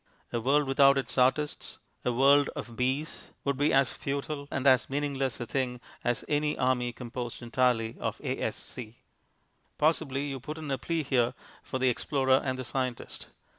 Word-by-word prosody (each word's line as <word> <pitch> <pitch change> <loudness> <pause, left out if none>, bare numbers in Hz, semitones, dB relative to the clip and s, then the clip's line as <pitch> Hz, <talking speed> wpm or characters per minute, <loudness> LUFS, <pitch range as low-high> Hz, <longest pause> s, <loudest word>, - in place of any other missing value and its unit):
A 120 - 0
world 145 +5 +3
without 135 +1 +5
its 135 - -2
artists, 130 +4 +1 0.3
a 125 - +1
world 140 +3 +5
of 120 - -6
bees, 130 +6 -1 0.2
would 140 0 0
be 145 +3 +2
as 135 -1 +3
futile 140 +1 -4
and 135 - -3
as 130 -3 +5
meaningless 135 -3 -1
a 120 - -3
thing 125 0 -2 0.2
as 120 -2 0
an 150 0 0
army 125 -1 +1
composed 120 0 -6
entirely 120 -2 +1
of - - -2
the - - -3
A.S.C. 115 -1 -5 0.8
Possibly 150 -3 +1
you 135 -2 -4
put 150 +5 -6
in 155 -3 -5
a 135 - 0
plea 165 -2 -1
here 125 -2 +1 0.3
for - - -4
the 130 0 +3
explorer 130 +1 +2
and 130 -1 -1
the 130 - -4
scientist. 125 0 -3
130 Hz, 170 wpm, -29 LUFS, 125-140 Hz, 0.8 s, without